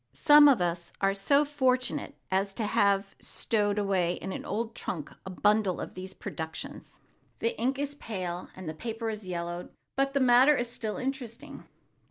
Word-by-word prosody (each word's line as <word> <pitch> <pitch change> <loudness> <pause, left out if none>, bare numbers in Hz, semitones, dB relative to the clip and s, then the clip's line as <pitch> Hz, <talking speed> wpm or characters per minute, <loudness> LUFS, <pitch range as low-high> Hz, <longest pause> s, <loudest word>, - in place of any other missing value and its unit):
Some 295 -1 +7
of 265 -9 +5
us 170 0 -2
are 195 0 +2
so 280 +9 +3
fortunate 255 -3 0 0.2
as 195 +1 0
to 225 - -2
have 200 -2 +2
stowed 205 -2 -1
away 190 -4 +1
in 190 - -6
an - - -5
old 225 +2 -3
trunk 155 -8 -5 0.2
a - - -4
bundle 205 0 +2
of - - -6
these 185 +1 -8
productions. 160 -1 -7 0.4
The 465 +1 -1
ink 265 +3 0
is 285 0 -2
pale 185 -9 -5
and 185 -2 -8
the 155 - -3
paper 225 +5 -4
yellowed, 175 -4 -5 0.3
but 275 +1 0
the - - +4
matter 260 +3 +6
is 240 -1 -2
still 215 -3 -4
interesting. 270 +1 -6
215 Hz, 170 wpm, -29 LUFS, 185-255 Hz, 0.4 s, Some